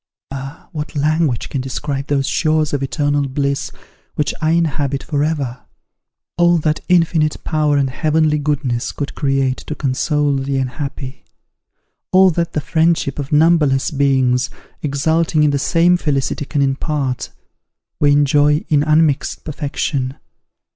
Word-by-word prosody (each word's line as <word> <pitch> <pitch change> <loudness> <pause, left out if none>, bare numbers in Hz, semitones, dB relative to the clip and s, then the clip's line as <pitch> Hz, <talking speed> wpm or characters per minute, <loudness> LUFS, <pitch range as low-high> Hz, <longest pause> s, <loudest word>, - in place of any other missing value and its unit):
Ah! 135 +1 -8
what 150 -3 -6
language 150 -3 0
can 135 - -2
describe 135 +1 -4
these 140 -1 0
shores 155 +1 +1
of 140 - 0
eternal 145 0 0
bliss, 140 +1 -1 0.5
which 150 - 0
I 155 - +1
inhabit 145 -4 0
for 145 -2 -1
ever! 140 -5 -2 0.8
All 175 0 +5
that 155 -1 0
infinite 165 -3 +2
power 150 -2 +1
and 140 -1 +2
heavenly 155 +1 +1
goodness 140 -5 -1
could 145 - -4
create 135 -2 0
to 150 - -7
console 140 +1 0
the 135 0 -2
unhappy: 135 0 -5 0.9
all 185 0 +6
that 170 0 -2
the 150 - -1
friendship 160 -2 +1
of 140 -1 -5
numberless 150 -3 +3
beings, 130 -3 +2 0.3
exulting 155 +2 +1
in 150 - +3
the 140 - 0
same 170 +4 +3
felicity 145 -3 -1
can 145 0 0
impart, 135 -1 -2 0.7
we 145 -1 +4
enjoy 145 +1 +3
in 145 -2 +3
unmixed 155 -1 +1
perfection. 140 -3 -3
145 Hz, 135 wpm, -18 LUFS, 135-155 Hz, 0.9 s, all